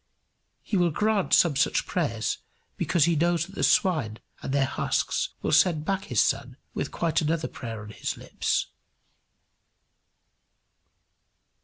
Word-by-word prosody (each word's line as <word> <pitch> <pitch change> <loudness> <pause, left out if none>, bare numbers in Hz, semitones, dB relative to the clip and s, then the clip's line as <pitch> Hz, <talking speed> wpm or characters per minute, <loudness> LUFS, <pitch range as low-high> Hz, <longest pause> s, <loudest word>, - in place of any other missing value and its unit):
He 205 - -1
will 175 -1 +3
grant 210 +4 0
some 165 -5 +5
such 145 - +1
prayers 115 -11 -1 0.4
because 170 -5 +2
he 170 -1 +2
knows 170 +1 +1
that 190 - -15
the - - -5
swine 150 - +2 0.2
and - - -4
their 140 0 +2
husks - - -1
will - - 0
send 155 -1 +3
back 195 +1 -1
his 125 -6 0
son 130 +1 -2 0.2
with 140 - -3
quite 165 -1 0
another 160 +1 0
prayer 115 -4 -7
on 105 - -10
his - - -4
lips. - - -1
160 Hz, 140 wpm, -26 LUFS, 135-175 Hz, 0.4 s, some